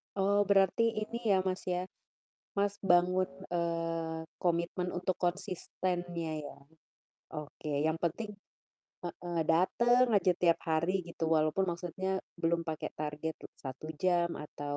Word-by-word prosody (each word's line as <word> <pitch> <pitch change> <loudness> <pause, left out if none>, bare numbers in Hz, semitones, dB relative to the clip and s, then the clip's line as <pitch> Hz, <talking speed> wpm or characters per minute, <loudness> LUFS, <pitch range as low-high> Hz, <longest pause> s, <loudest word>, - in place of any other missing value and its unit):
Oh, 200 +1 +3
berarti 195 +2 +5 0.2
ini 235 - -5
ya, 190 - +6
Mas 185 0 -1
ya, 180 0 0 0.7
Mas 200 0 +2 0.2
bangun, 180 +1 +5 0.3
eee, 165 -1 -1 0.2
komitmen 175 +1 +1
untuk 180 0 -1
konsistennya 175 -2 -2
ya. 145 - -8 0.8
Oke, 150 0 -6 0.2
yang 160 +1 +1
penting 180 +6 -2 0.7
heeh, 175 0 -4
dateng 240 +9 +4
aja 190 -2 +4
tiap 170 -2 +5
hari 160 +3 +2 0.2
gitu, 170 -1 -3
walaupun 155 +5 +2
maksudnya 185 +2 -2 0.2
belum 170 +1 +3
pake 155 - -2
target 150 +1 -3
le - - -7 0.2
1 135 +3 -6 0.2
jam 175 -2 +3
atau 145 -1 -5
175 Hz, 125 wpm, -32 LUFS, 165-185 Hz, 0.8 s, ya